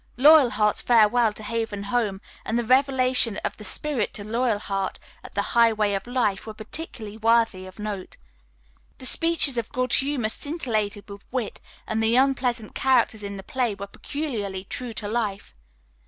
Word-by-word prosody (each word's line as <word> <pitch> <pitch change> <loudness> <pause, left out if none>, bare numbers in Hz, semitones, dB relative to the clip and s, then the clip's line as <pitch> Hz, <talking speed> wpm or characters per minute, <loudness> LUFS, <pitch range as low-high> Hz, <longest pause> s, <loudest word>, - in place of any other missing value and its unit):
Loyalheart's 255 -7 +5
farewell 230 0 +4
to 215 - -10
Haven 225 -2 -3
Home 205 -2 -1 0.2
and 225 - -1
the 240 - 0
revelation 255 -3 +3
of - - -3
the 210 - -10
Spirit 270 0 -1
to 205 - -3
Loyalheart 210 -4 -1 0.3
at - - -12
the 200 - +1
Highway 220 -3 +3
of 195 +3 -3
Life 230 -6 -1
were 215 - -7
particularly 220 -2 -7
worthy 225 -4 +2
of 185 - -13
note. 210 -3 -6 0.8
The 260 - -5
speeches 325 -4 +4
of 225 - -6
Good 255 -1 -1
Humor 265 -5 +1
scintillated 220 -8 -2
with 200 -1 -10
wit, 245 -4 -3 0.3
and 220 0 -1
the 225 +1 +3
unpleasant 250 -4 +1
characters 245 -5 +2
in 200 -1 -6
the 195 - -8
play 240 -1 -1
were 200 0 -6
peculiarly 205 -5 -5
true 240 +4 -5
to 210 - -4
life. 210 -3 -3
225 Hz, 160 wpm, -24 LUFS, 205-255 Hz, 0.8 s, Loyalheart's